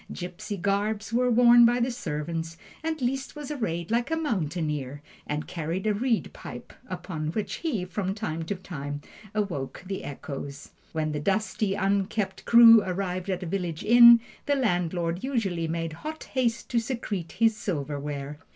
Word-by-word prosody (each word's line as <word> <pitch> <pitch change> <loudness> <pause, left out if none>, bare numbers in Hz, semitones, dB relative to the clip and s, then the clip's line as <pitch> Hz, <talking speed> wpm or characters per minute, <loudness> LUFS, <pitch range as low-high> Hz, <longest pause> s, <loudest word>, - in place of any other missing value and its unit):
Gipsy 180 +3 -5
garbs 205 +3 -1
were 250 +1 +3
worn 240 0 +7
by 240 +1 +5
the 245 +2 +1
servants, 165 -5 -4 0.3
and 320 -1 -2
Liszt 265 +4 -2
was 295 -1 -6
arrayed 180 - -3
like 235 +3 +1
a 325 - +1
mountaineer, 155 - -2 0.2
and 150 +1 -2
carried 175 +2 -3
a 215 - +3
reed 230 +2 0
pipe, - - -9 0.2
upon 175 -4 -4
which 205 -3 -2
he, 250 - -2
from 190 +1 -3
time 165 -7 -3
to 200 - -2
time, 145 -6 -6 0.3
awoke 180 -9 -3
the 195 +1 -4
echoes. 140 0 -7 0.2
When 155 -1 -1
the 150 - -2
dusty, 200 +3 0
unkempt 195 0 -1
crew 230 -1 +9
arrived 185 0 -3
at 185 -1 -1
a - - -4
village 175 -2 -3
inn, 235 0 +9 0.3
the 285 - +3
landlord 175 -7 0
usually 200 -11 -1
made 165 0 -3
hot 315 +1 -5
haste 240 -4 0
to 240 - +2
secrete 220 -8 -4
his 225 -1 +3
silverware. 145 -5 -4
195 Hz, 160 wpm, -27 LUFS, 165-230 Hz, 0.3 s, crew